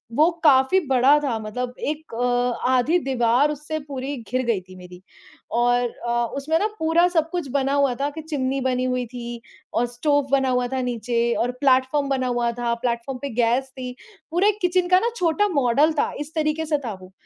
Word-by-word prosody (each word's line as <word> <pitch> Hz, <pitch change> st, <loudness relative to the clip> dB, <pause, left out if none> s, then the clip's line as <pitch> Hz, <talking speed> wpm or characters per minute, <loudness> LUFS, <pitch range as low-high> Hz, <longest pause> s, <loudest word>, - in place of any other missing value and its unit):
वो 315 Hz, +3 st, +5 dB
काफ़ी 275 Hz, +5 st, +5 dB
बड़ा 265 Hz, +3 st, +5 dB
था 240 Hz, -5 st, -1 dB
मतलब 245 Hz, +4 st, -4 dB
एक 305 Hz, -3 st, -4 dB
अ, 245 Hz, +1 st, 0 dB
आधी 260 Hz, +8 st, +3 dB
दीवार 260 Hz, +1 st, +2 dB
उससे 300 Hz, +2 st, -4 dB
पूरी 275 Hz, +1 st, -4 dB
घिर 255 Hz, +3 st, -2 dB
गई 225 Hz, -5 st, 0 dB
थी 185 Hz, 0 st, -15 dB
मेरी। 180 Hz, 0 st, -12 dB, 0.5 s
और 245 Hz, +1 st, +2 dB, 0.2 s
अ, 240 Hz, 0 st, +1 dB
उसमें 310 Hz, +4 st, 0 dB
ना 425 Hz, -, +1 dB
पूरा 325 Hz, +2 st, +3 dB
सब 325 Hz, -2 st, 0 dB
कुछ 350 Hz, -5 st, -3 dB
बना 275 Hz, 0 st, 0 dB
हुआ 280 Hz, -3 st, +2 dB
था 285 Hz, -, +1 dB
कि 315 Hz, +2 st, -8 dB
चिमनी 275 Hz, -4 st, -2 dB
बनी 255 Hz, -1 st, 0 dB
हुई 250 Hz, -1 st, -1 dB
थी 235 Hz, -1 st, -6 dB, 0.3 s
और 240 Hz, -, +2 dB
स्टोव 285 Hz, +3 st, 0 dB
बना 270 Hz, -1 st, +3 dB
हुआ 250 Hz, -1 st, +1 dB
था 260 Hz, -, 0 dB
नीचे 235 Hz, -1 st, -1 dB
और 245 Hz, +1 st, 0 dB
प्लेटफॉर्म 275 Hz, +1 st, +2 dB
बना 260 Hz, -2 st, 0 dB
हुआ 240 Hz, -1 st, 0 dB
था, 235 Hz, 0 st, -2 dB
प्लेटफॉर्म 240 Hz, +2 st, -3 dB
पे 280 Hz, -, -3 dB
गैस 245 Hz, +3 st, +1 dB
थी। 250 Hz, -1 st, -6 dB, 0.4 s
पूरे 385 Hz, +5 st, +3 dB
किचन 360 Hz, 0 st, +2 dB
का 365 Hz, 0 st, +6 dB
ना 470 Hz, -, 0 dB
छोटा 365 Hz, +1 st, +1 dB
मॉडल 280 Hz, +3 st, +3 dB
था, -, -, +1 dB
इस 295 Hz, +2 st, -6 dB
तरीके 310 Hz, 0 st, 0 dB
से 300 Hz, -1 st, +1 dB
था 220 Hz, -, -3 dB
वो, 185 Hz, -, -13 dB
260 Hz, 200 wpm, -23 LUFS, 245-300 Hz, 0.5 s, का